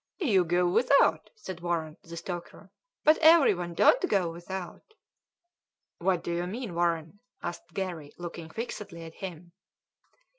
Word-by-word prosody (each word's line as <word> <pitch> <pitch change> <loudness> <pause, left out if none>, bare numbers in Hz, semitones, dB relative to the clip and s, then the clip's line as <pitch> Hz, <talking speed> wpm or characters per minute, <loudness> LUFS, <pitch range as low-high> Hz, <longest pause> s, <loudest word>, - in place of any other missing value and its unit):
"You 210 - +3
go 175 +2 +2
without," 235 +1 +3
said 190 -5 -8
Warren, 165 -3 -2
the 170 0 -10
stoker; 175 0 -7 0.3
"but 310 +1 +5
everyone 265 - +5
don't 415 - +4
go 180 -4 +2
without." 180 - -8 1.0
"What 180 -1 +1
do - - -3
you 175 +1 -1
mean, 220 0 -5
Warren?" 170 +1 -1 0.2
asked 175 -1 -6
Garry, 170 -6 -4
looking 170 -2 -7
fixedly 200 -4 -6
at 165 0 -9
him. 175 -2 -8
175 Hz, 135 wpm, -29 LUFS, 170-200 Hz, 1.0 s, but